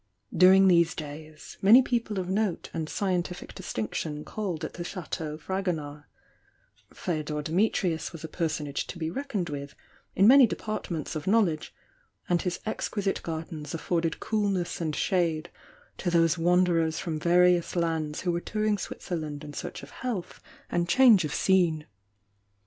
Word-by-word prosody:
During 190 +2 +7
these 170 -1 +4
days, 155 0 -9
many 225 +7 +8
people 230 -4 -1
of 185 -1 -2
note 195 -1 -1
and 160 -1 -3
scientific 180 -2 -2
distinction 150 +7 -4
called 190 -7 -4
at - - -7
the 175 - -5
Chateau 160 -4 -5
Fragonard, 155 -4 -3 0.5
— - - -37
Feodor 155 -3 -2
Dimitrius 170 -1 0
was 165 - -10
a - - -4
personage 155 -4 -2
to - - -7
be 160 -1 -3
reckoned 220 - -3
with 140 -1 -6 0.4
in 195 - +5
many 265 0 +8
departments 175 -8 -4
of 155 +1 -5
knowledge, 190 -7 +2 0.6
and 175 -1 +2
his 180 -1 -2
exquisite 205 -2 -2
gardens 160 -1 -5
afforded 165 0 -1
coolness 200 -6 -1
and 155 -3 -1
shade 170 -1 0 0.5
to 180 - -1
those 165 -2 +3
wanderers 170 -2 +2
from 160 -3 -3
various 175 +1 +3
lands 160 -3 -1
who 180 - 0
were 170 0 -2
touring 215 0 -1
Switzerland 155 -5 -5
in 145 -1 -8
search - - -6
of 140 - -11
health 180 - -5 0.3
and 175 0 0
change 235 -5 +6
of 150 - -4
scene. 170 -5 +2
170 Hz, 150 wpm, -27 LUFS, 155-190 Hz, 0.6 s, many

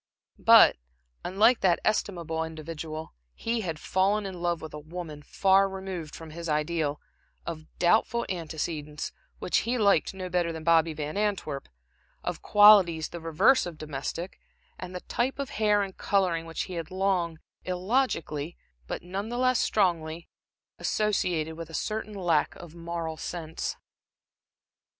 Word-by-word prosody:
But, - - +8 0.5
unlike 220 +6 +4
that 180 -3 +3
estimable 170 -6 0
individual, 160 0 -6 0.2
he 230 0 -1
had 165 -6 -3
fallen 200 +5 +1
in 185 -3 -6
love 175 -1 0
with 160 - -9
a 150 - -6
woman 155 -1 -7
far 195 +5 +3
removed 190 -5 -6
from 160 -1 -9
his 170 +1 -6
ideal, 150 -1 0 0.5
of 160 -2 -6
doubtful 220 +6 +3
antecedents 155 -3 -4 0.3
which - - +1
he 240 +3 -1
liked 200 -5 +3
no 185 -1 -5
better 175 -1 0
than 160 -1 -7
Bobby 165 0 +4
Van 150 +3 -4
Antwerp, 195 -10 -2 0.5
of - - -3
qualities 195 -7 +6
the 170 - -7
reverse 165 - +4
of 170 -3 -8
domestic, 155 +4 -5 0.4
and 180 0 -7
the 180 - -4
type 255 +3 -1
of 280 -2 -4
hair 210 -1 +2
and 195 -1 -6
coloring 180 -5 +1
which 165 - -3
he 185 - -8
had 165 -2 -4
long 185 -3 0 0.3
illogically, 180 - -1 0.3
but - - -4
none 195 +4 -4
the 240 - -3
less 255 -1 +3
strongly, 170 -5 0 0.5
associated 180 -7 0
with 165 -1 -7
a 165 - -7
certain 215 +4 -3
lack 170 -6 +1
of 170 -2 -11
moral 170 -1 -4
sense. 160 -2 -4
175 Hz, 145 wpm, -28 LUFS, 160-195 Hz, 0.5 s, But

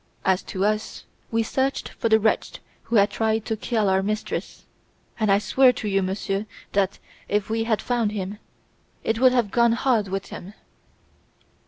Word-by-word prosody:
As 190 0 +3
to 190 +1 -2
us, 215 +1 -2 0.3
we 225 0 +1
searched 265 +4 -1
for 230 - -2
the 220 0 +5
wretch 220 +1 +1 0.3
who 235 - -2
had 200 -1 +5
tried 220 -1 0
to 220 - -1
kill 220 -1 0
our 190 0 +3
mistress, 215 +2 -4 0.5
and 215 -2 +2
I 195 - +6
swear 250 +6 +4
to 220 - -5
you, 195 -1 +2
monsieur, 195 +2 -2 0.2
that, 200 -1 +1 0.3
if 210 +1 0
we 225 0 0
had 220 -2 0
found 235 -4 0
him, 205 0 -4 0.6
it 225 0 0
would 255 0 +6
have 240 -5 +1
gone 235 -1 +4
hard 230 -3 +1
with 195 +1 -4
him! 195 +4 -9
215 Hz, 175 wpm, -24 LUFS, 200-230 Hz, 0.6 s, I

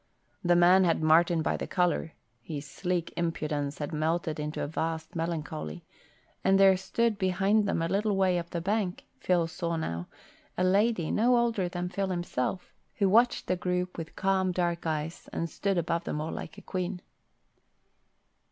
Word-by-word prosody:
The 175 0 +4
man 180 +2 +6
had 165 -2 +2
Martin 165 +1 +4
by - - 0
the - - -4
collar 175 -3 0 0.3
(his 145 +2 -6
sleek 175 +4 -2
impudence 155 -4 -2
had 145 +1 -4
melted 160 +1 -1
into 150 +1 -3
a - - -2
vast 160 +1 -3
melancholy), 150 - -4 0.6
and 195 +1 +4
there 195 -1 +7
stood 215 +3 0
behind 195 +3 +2
them 165 - 0
a - - +1
little 200 +3 +1
way 185 -2 +2
up 170 0 -7
the 170 - -3
bank, 195 0 -1
Phil 180 -2 +2
now - - +1
saw, 160 - -3 0.5
a 180 - +1
lady 195 -2 +2
no 240 +3 +4
older 230 -6 +1
than 175 0 -3
Phil 195 +2 -2
himself, 175 -2 -3 0.2
who 200 - +2
watched 235 +5 +4
the 185 - +1
group 180 0 -2
with 165 -1 -7
calm, 190 -1 +1
dark 175 -2 -1
eyes 155 +1 -3
and 165 - -2
stood 195 -2 -1
above 170 0 -1
them 150 - -2
all 155 +1 -3
like - - -7
a - - -11
queen. 185 0 -3
175 Hz, 170 wpm, -29 LUFS, 160-190 Hz, 0.6 s, there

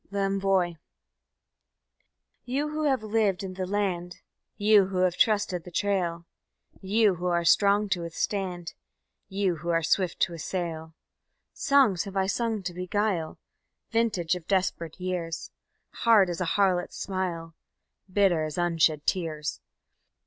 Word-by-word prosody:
L'Envoi 195 -3 0 1.7
You 275 +5 -2
who 305 0 -2
have 265 -6 +1
lived 210 -3 +1
in 190 -1 -5
the 185 0 -4
land, 180 -3 -2 0.4
You 205 -2 +5
who 190 -1 -4
have 180 -1 +2
trusted 200 -4 +1
the 180 - -10
trail, 175 -3 -1 0.6
You 205 +1 +3
who 180 +1 -3
are 170 -1 +1
strong 200 +4 +4
to 180 -2 0
withstand, 175 +1 -3 0.6
You 190 -3 0
who 170 +3 -6
are 165 -1 +2
swift 175 +2 +1
to 175 - +2
assail: 165 -1 -4 0.6
_Songs 260 -11 +3
have 195 -1 -6
I 190 - +2
sung 220 0 -1
to 180 -1 -4
beguile, 180 -2 -1 0.5
Vintage 220 -8 +1
of 175 -2 -9
desperate 185 -4 -1
years, 180 -3 -4 0.4
Hard 210 -6 +4
as 175 - -4
a - - +1
harlot's 185 -3 +1
smile, 175 -4 -3 0.6
Bitter 185 -5 +3
as 155 +1 -6
unshed 165 -3 +2
tears. 160 -5 -2
185 Hz, 135 wpm, -27 LUFS, 170-205 Hz, 1.7 s, You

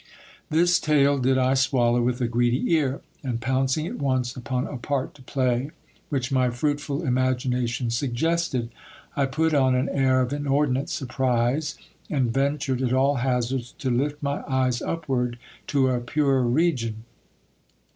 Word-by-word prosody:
This 175 +3 +3
tale 145 -2 +3
did 130 +1 +2
I 130 0 +3
swallow 125 -2 +2
with 125 +1 0
a 120 - +2
greedy 120 +5 +1
ear; 140 -4 +1 0.2
and 125 -4 -2
pouncing 130 +4 0
at - - -5
once 130 -3 0
upon 125 +1 -2
a - - -6
part 135 +1 -2
to 145 - -17
play, 130 0 0 0.4
which 135 -3 -2
my 130 -2 +3
fruitful 145 +4 -2
imagination 125 -2 0
suggested, 130 0 -1 0.4
I 140 -2 +1
put 160 +4 0
on 130 -3 +3
an 130 +2 0
air 130 -1 +2
of 125 +2 -1
inordinate 140 -1 0
surprise, 130 +2 0 0.3
and 130 -6 0
ventured 135 -1 0
at 125 -1 0
all 135 +2 +3
hazards 125 0 -1
to 130 -2 -2
lift 145 +4 -1
my 140 0 -1
eyes 130 -2 +1
upward 130 -7 -2 0.3
to 135 -2 +2
a 125 -1 +1
purer 135 -1 +1
region. 120 -6 0
130 Hz, 150 wpm, -25 LUFS, 125-140 Hz, 0.4 s, This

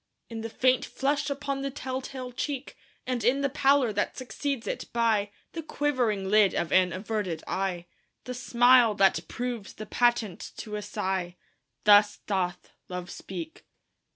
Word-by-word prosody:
In 225 -1 -5
the 225 - -4
faint 255 +3 +2
flush 280 +1 -1
upon 280 -1 -3
the 275 - -2
tell 265 -1 -4
tale 255 -1 -7
cheek, 275 +2 -4 0.3
And 250 -3 -2
in 255 +5 +3
the 280 - +1
pallor 270 -3 +3
that 205 - -1
succeeds 255 +1 -3
it; - - -4
by 225 -3 +2 0.2
The 330 - -5
quivering 250 -11 0
lid 205 -1 +4
of 170 - -1
an 185 -1 +4
averted 190 -3 -3
eye 185 -2 -2 0.4
The 250 - -5
smile 245 -2 +5
that 195 -4 +4
proves 240 -5 -4
the 215 - -8
patent 230 -5 0
to 210 -2 -6
a 210 - -3
sigh 190 -3 -2 0.5
Thus 205 0 +6
doth 180 -3 -3 0.2
Love 180 -1 -5
speak. 175 -4 -8
225 Hz, 155 wpm, -28 LUFS, 195-260 Hz, 0.5 s, Thus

